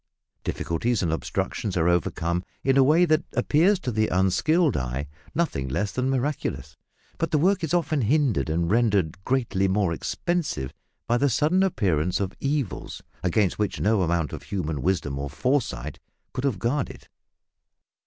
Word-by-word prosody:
Difficulties 110 +6 -1
and 80 -2 0
obstructions 90 +4 -2
are 85 0 +2
overcome 85 0 0 0.2
in 135 0 +3
a 135 - +6
way 160 +6 +5
that 155 0 +2
appears 180 +7 +3
to 125 - -2
the 110 -1 +1
unskilled 140 - +2
eye 65 +3 -2 0.3
nothing 150 - 0
less 100 +11 -1
than 130 +1 -1
miraculous. 130 - -2 0.4
But 165 - 0
the 155 - +2
work 185 +4 +2
is 160 - -1
often 160 -4 +1
hindered 130 - +2
and 85 +2 0
rendered 100 -6 +1
greatly 115 -7 +1
more 95 -2 +1
expensive 150 - -2 0.3
by 120 - +2
the 140 - +3
sudden 155 +9 +2
appearance 90 - +1
of 95 -2 -2
evils 140 - -3 0.2
against 90 +2 +1
which 105 -2 -1
no 105 -1 +2
amount 85 -4 0
of - - -5
human 80 -7 -3
wisdom 75 -7 -1
or 70 0 -3
foresight 75 - -1 0.3
could 130 +1 -2
have 130 -7 +1
guarded. 125 +8 -2
105 Hz, 155 wpm, -25 LUFS, 85-145 Hz, 0.4 s, a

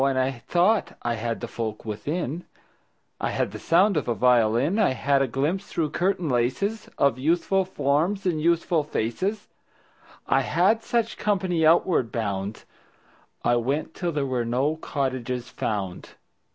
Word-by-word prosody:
And 135 -1 +2
I 130 +1 +2
thought 175 - +1
I 120 - 0
had 115 0 -3
the - - -4
folk 110 -2 -5
within: 145 +9 -3 0.7
I - - -1
had - - -1
the - - -7
sound 185 +2 +3
of 150 - -1
a 120 - 0
violin; 125 - +3
I 200 -11 +3
had 140 +1 +1
a 135 - +2
glimpse 150 - -1
through 155 -3 -2
curtain 180 0 0
laces 140 - -1
Of 140 -3 +2
youthful 175 +6 +1
forms 180 +4 0
and 165 -4 0
youthful 170 -1 +2
faces. 170 - -2 0.8
I - - +3
had 225 +1 +2
such 230 0 -1
company 185 -5 0
outward 160 - +3
bound. 100 -2 -3 0.8
I 120 - +3
went 140 +7 -1
till 175 -2 -2
there 145 -3 -1
were 130 -3 -1
no 130 +6 0
cottages 130 -5 -3
found. 95 -4 -4
140 Hz, 150 wpm, -25 LUFS, 120-175 Hz, 0.8 s, sound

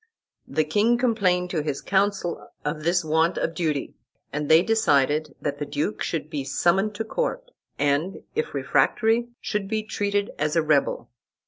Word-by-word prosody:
The 155 - +1
king 210 +10 +2
complained 190 -8 +1
to 160 - 0
his 145 -2 -3
council 195 -3 0 0.2
of 150 +1 -2
this 170 +1 +1
want 160 +2 +2
of 165 - -1
duty, 155 -5 -2 0.4
and 150 0 -2
they 160 +2 +7
decided 150 -8 +2
that 145 -1 -3
the 145 - -2
duke 145 +8 -2
should 160 -3 -2
be 150 -3 -4
summoned 185 +9 +1
to 225 - -2
court, - - -3 0.3
and, 145 +6 0
if 460 +1 -2
refractory, 230 +1 +2
should 210 -2 -2
be 215 +1 -1
treated 205 -1 -1
as 150 +1 0
a 165 - +3
rebel. 150 -2 +1
170 Hz, 160 wpm, -25 LUFS, 150-210 Hz, 0.4 s, they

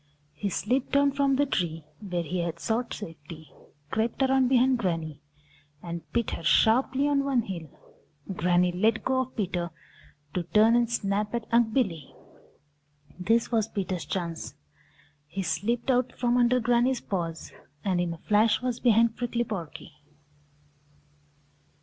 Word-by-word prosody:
He 175 +7 -3
slipped 245 +8 -1
down 280 0 +4
from 275 0 +2
the 285 +2 +2
tree 165 - -2
where 180 -5 -3
he 175 +3 -3
had 170 -1 -3
sought 230 +6 -1
safety, 160 -4 -9 0.4
crept 230 +4 0
around 265 -1 +3
behind 255 0 +3
Granny, 165 -7 -2 0.6
and 170 -1 -5
bit 235 -2 0
her - - -5
sharply 260 - +3
on 280 -1 +2
one 270 -4 +1
heel. 170 -6 -6 0.6
Granny 180 +1 +2
let 215 +5 +1
go 260 0 +1
of 260 0 -3
Peter 180 -5 -2 0.6
to 180 - 0
turn 215 +6 +4
and 240 -1 +2
snap 210 -1 -1
at 235 -1 -3
Unc' 230 -1 +3
Billy. 195 - -1 1.0
This 225 +7 +1
was 220 -2 +2
Peter's 185 -5 -3
chance. 170 -3 -4 0.7
He 190 +6 -4
slipped 205 +10 0
out 250 0 +1
from 245 -1 0
under 250 0 +4
Granny's 245 +2 +2
paws 165 -4 -4 0.3
and 185 -3 +1
in 175 -1 -1
a 165 - -6
flash 210 +5 +2
was 250 -1 -2
behind 230 -1 +4
Prickly 240 -1 -1
Porky. 175 -6 -7
220 Hz, 145 wpm, -27 LUFS, 175-245 Hz, 1.0 s, down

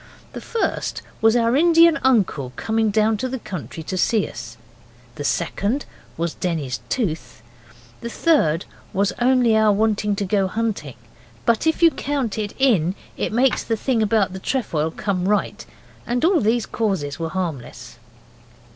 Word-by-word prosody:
The - - -6
first 460 - -2 0.2
was 225 +1 +5
our 235 0 +3
Indian 330 +1 +5
uncle 190 - +1
coming 220 - 0
down 215 +1 +2
to 255 +5 -3
the 260 - -3
country 175 - -7
to 185 +3 -4
see 220 0 +2
us. 115 0 -9 0.6
The 145 - -6
second 200 - -1 0.3
was 170 0 -2
Denny's 150 -8 -3
tooth. 165 - -3 0.6
The 235 - -6
third 205 - +2 0.3
was 200 +1 +1
only 245 -2 +4
our 220 -1 +4
wanting 210 0 +1
to 200 - -2
go 195 0 +1
hunting; 200 - -3 0.5
but 235 +6 +2
if 320 +1 +1
you 335 - +7
count 275 -9 -2
it 205 -1 -4
in 195 - +2 0.2
it - - -2
makes 250 +4 +2
the 225 - -1
thing 240 0 0
about 210 -3 +2
the 190 - -6
trefoil 175 - -1
come 190 0 -2
right. 210 - 0 0.4
And 245 +4 +1
all 355 -1 +4
these 225 +2 +1
causes 180 -10 -2
were 165 -1 -2
harmless. 150 -9 -5
215 Hz, 155 wpm, -22 LUFS, 175-240 Hz, 0.6 s, you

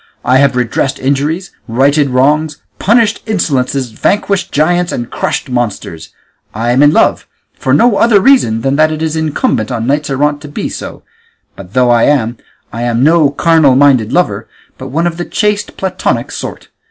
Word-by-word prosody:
I 130 - +3
have 140 -1 +2
redressed 125 +2 -1
injuries, 145 +7 -2 0.2
righted 140 +5 +2
wrongs, 145 +4 +1 0.2
punished 225 0 +2
insolences, 135 - -1
vanquished 200 - -1
giants, 175 +4 +1
and 120 0 -5
crushed - - -3
monsters; 115 -10 -4 0.5
I 115 +2 -1
am 130 +3 +2
in 145 0 +6
love, - - +1 0.3
for 130 - -3
no 205 - +3
other 230 -3 +4
reason 190 - +3
than 135 +3 0
that 155 0 +3
it 155 0 -4
is 160 0 -2
incumbent 150 -7 -1
on 115 -2 -3
knights 145 +3 -1
errant 145 +2 0
to 150 - -9
be 145 - -5
so; - - -8 0.5
but 95 0 -13
though 125 -1 +3
I 120 -1 +3
am, 120 -5 0 0.4
I 115 - -5
am 120 0 0
no 160 -1 +4
carnal 150 -2 +3
minded 130 -5 +3
lover, 110 - 0 0.3
but 130 - -7
one 160 +6 -1
of 170 -1 -2
the 175 - -4
chaste, 210 -1 -2
platonic 190 -1 -2
sort. - - -7
140 Hz, 175 wpm, -12 LUFS, 125-165 Hz, 0.5 s, in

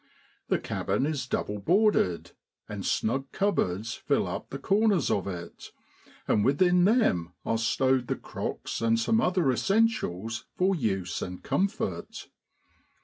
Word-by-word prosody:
The - - +2
cabin 130 - -1
is 145 -4 -2
double 105 -3 -2
boarded; 175 - +2 0.4
and 105 -2 -6
snug 135 +8 -1
cupboards 115 - 0
fill 140 -7 0
up 95 +3 -5
the 135 - -5
corners 200 - +2
of 100 -1 0
it, 90 -3 -7 0.6
and 105 - +3
within 180 - +4
them 90 - +2
are 115 - 0
stowed 130 +2 +1
the - - 0
crocks - - -5
and 115 0 +2
some 225 - +2
other 180 -7 +2
essentials 120 - 0
for 190 +2 +3
use 95 - -2
and 90 0 -6
comfort. 200 +3 -2
130 Hz, 135 wpm, -28 LUFS, -, 0.6 s, within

